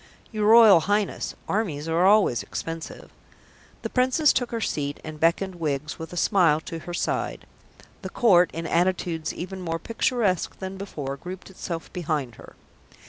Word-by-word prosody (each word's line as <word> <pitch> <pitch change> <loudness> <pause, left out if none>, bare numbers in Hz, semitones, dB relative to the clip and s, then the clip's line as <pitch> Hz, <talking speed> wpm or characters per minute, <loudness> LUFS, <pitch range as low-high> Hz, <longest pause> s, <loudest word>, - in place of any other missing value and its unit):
"Your 215 -2 0
Royal 220 -5 +8
Highness, 205 +4 -1
armies 165 -8 -2
are 170 +3 +3
always 195 - +4
expensive." 165 +10 -7 0.7
The - - -3
Princess 260 +4 +3
took 245 - -1
her 230 - -3
seat, 145 -8 -2
and 155 -1 -8
beckoned 175 +3 +1
Wiggs 150 -1 -3
with 160 0 -7
a 175 - -7
smile 170 -5 +3
to 165 +1 -7
her 175 +2 -8
side. - - -2 0.6
The - - -6
Court, 180 -7 +4
in 165 0 -5
attitudes 170 -2 0
even 185 +2 -7
more 165 -2 -2
picturesque 225 -2 -1
than 190 0 -6
before, 145 -8 -6
grouped 185 +6 -9
itself 170 -3 -6
behind 155 -8 -2
her. - - -14
175 Hz, 155 wpm, -25 LUFS, 160-200 Hz, 0.7 s, Royal